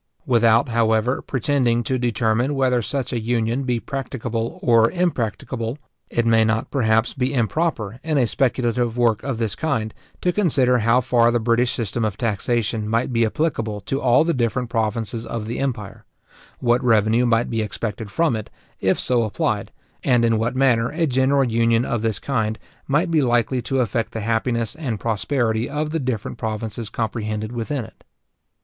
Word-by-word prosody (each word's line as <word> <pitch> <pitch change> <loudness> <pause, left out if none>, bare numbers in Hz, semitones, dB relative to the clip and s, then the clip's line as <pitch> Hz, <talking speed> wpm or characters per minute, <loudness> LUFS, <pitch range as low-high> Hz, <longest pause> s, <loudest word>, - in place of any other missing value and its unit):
Without, 115 0 +3
however, 115 +2 +1
pretending 130 -4 0
to 130 +3 -1
determine 120 +2 +1
whether 130 -2 +2
such 125 +4 -3
a 120 - 0
union 120 +3 0
be 125 -2 0
practicable 120 -3 -4
or 115 -1 +5
impracticable, 125 - -2 0.3
it 120 - 0
may 115 -1 +4
not, 110 0 0
perhaps, 110 -3 +2
be 130 -1 -1
improper, 120 - -1
in 155 -2 0
a 130 - +4
speculative 120 -2 0
work 115 -3 +2
of 135 -3 -3
this 110 -3 -1
kind, 110 -9 -2 0.3
to 180 - +1
consider 135 -10 +3
how 115 +3 +3
far 120 -2 +3
the 120 0 +1
British 120 +2 +2
system 115 0 -2
of 105 -3 -1
taxation 110 -1 -1
might 115 +3 0
be 115 0 +3
applicable 115 -6 -2
to 135 +8 -3
all 125 +3 +4
the 170 +1 +1
different 120 -1 -1
provinces 115 0 -1
of 115 -2 -5
the 115 - -4
empire; 120 -7 -4 0.5
what 120 +1 +1
revenue 115 +1 +3
might 115 0 +1
be 115 -1 0
expected 110 0 -4
from 155 +3 +1
it, 110 -1 -6 0.3
if 95 0 +1
so 125 -2 +2
applied; 110 -2 -1 0.3
and 120 -3 +3
in 115 -1 +2
what 115 +3 -1
manner 125 -3 +3
a 165 +1 0
general 135 0 +2
union 115 0 +2
of 120 -3 -1
this 110 -2 0
kind 110 -5 -1 0.3
might 155 +5 +1
be 160 -2 +3
likely 120 0 +1
to 135 +3 -1
affect 115 0 -1
the 110 - -3
happiness 115 +1 0
and 135 -9 -4
prosperity 115 +1 0
of 150 +1 -2
the 165 - -1
different 125 -6 -3
provinces 110 0 -4
comprehended 110 -1 -3
within 120 +2 -3
it. - - -18
120 Hz, 170 wpm, -22 LUFS, 110-130 Hz, 0.5 s, or